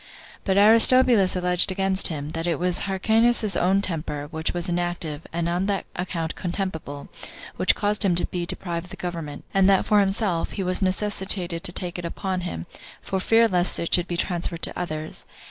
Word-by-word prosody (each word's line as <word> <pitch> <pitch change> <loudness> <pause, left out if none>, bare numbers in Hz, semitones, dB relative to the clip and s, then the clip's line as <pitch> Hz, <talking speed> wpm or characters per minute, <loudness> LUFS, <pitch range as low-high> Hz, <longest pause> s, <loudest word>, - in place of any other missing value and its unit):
But 195 -1 +1
Aristobulus 225 -1 +6
alleged 180 +1 +2
against 190 0 +2
him, 150 -3 -5
that 165 +1 -4
it 170 - 0
was 180 +2 -1
Hyrcanus's 220 +2 +2
own 195 +3 +2
temper, 150 -5 -3
which 160 -1 -2
was 175 +1 -3
inactive, 175 -3 -3
and 170 0 -2
on 175 +3 -1
that 200 -1 -1
account 170 -2 -3
contemptible, 170 -6 -5 0.5
which - - +3
caused 210 +1 +1
him 185 -3 +2
to 175 - +2
be 175 -1 -4
deprived 170 -1 -5
of - - -16
the - - -8
government; 165 -5 -6
and 195 0 +4
that 195 -1 +3
for 210 - +3
himself, 195 -3 0
he 195 - -3
was 185 +2 +1
necessitated 190 -3 -2
to - - +1
take 175 0 -4
it 175 - -6
upon 185 +2 -3
him, 85 - -5 0.3
for 190 - -3
fear 225 +4 +4
lest 180 -3 +1
it 170 - -3
should 175 0 +3
be 175 - -3
transferred 170 -2 -2
to - - 0
others. 155 -3 -5
180 Hz, 190 wpm, -24 LUFS, 170-195 Hz, 0.5 s, Aristobulus